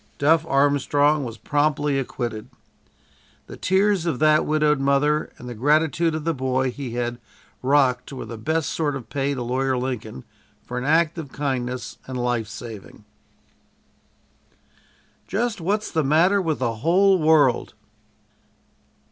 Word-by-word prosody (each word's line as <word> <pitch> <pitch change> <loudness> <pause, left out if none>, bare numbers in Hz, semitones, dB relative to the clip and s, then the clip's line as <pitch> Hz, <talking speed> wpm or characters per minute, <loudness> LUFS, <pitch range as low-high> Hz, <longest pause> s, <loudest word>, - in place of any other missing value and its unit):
"Duff" 160 +2 +3
Armstrong 145 +1 +2
was 115 -3 -6
promptly 145 +3 0
acquitted. 120 -4 -5 1.0
The - - -10
tears 190 -2 +1
of 155 -7 0
that 155 +1 +3
widowed 150 -2 +2
mother 140 +2 +1
and 125 - -10
the 120 - -5
gratitude 155 +6 +1
of 155 - -4
the 165 +1 0
boy 130 -1 -1
he 125 -2 -6
had 120 0 -2 0.4
rocked 130 -1 +2
were 135 - -6
the 115 - -7
best 155 +8 -1
sort 150 -3 -1
of 130 -4 -9
pay 140 0 -1
to 125 - -4
Lawyer 130 +2 0
Lincoln 120 - -4 0.4
for 125 +1 -5
an 125 - -5
act 165 +2 +2
of 145 -5 -8
kindness 125 -4 -3
and 130 -1 -5
life 120 -3 -1
saving. 110 -2 -10 2.2
"JUST 215 0 -2
WHAT'S 205 +5 -1
THE 160 -2 +1
MATTER 170 +8 +3
WITH 160 -4 -1
THE 115 -3 -2
WHOLE 185 - +3
WORLD!" 155 -6 +3
140 Hz, 140 wpm, -23 LUFS, 125-160 Hz, 2.2 s, Duff